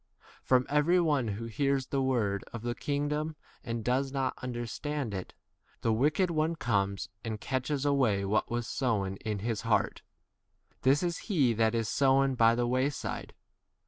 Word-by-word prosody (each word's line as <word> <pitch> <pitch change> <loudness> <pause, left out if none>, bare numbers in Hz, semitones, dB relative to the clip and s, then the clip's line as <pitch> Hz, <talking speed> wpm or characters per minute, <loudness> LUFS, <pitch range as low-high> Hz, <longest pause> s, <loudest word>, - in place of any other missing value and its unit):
From 130 -1 +3
every 150 +5 +3
one 145 -8 +2
who 105 +2 -4
hears 135 +3 0
the 135 0 -1
word 110 -7 0
of 115 -1 -7
the 120 0 -1
kingdom 150 +4 -2 0.3
and 115 -2 -4
does 130 +2 +1
not 135 -2 0
understand 125 +1 -3
[it], 95 -2 -6 0.5
the 115 - +2
wicked 150 +9 +2
one 160 +1 +1
comes 100 -8 -1
and 110 -2 -4
catches 130 +4 -2
away 125 -9 +2
what 105 +2 +1
was 120 0 -2
sown 105 -7 -1
in 105 0 -3
his 115 -3 -1
heart: - - +1 0.8
this 135 +5 +3
is 175 -1 -1
he 140 - +3
that 110 +1 +2
is 115 -2 0
sown 135 +3 +3
20 - - -1
by 115 -1 +5
the 120 0 +1
wayside. 130 +3 -2
130 Hz, 165 wpm, -30 LUFS, 115-145 Hz, 0.8 s, by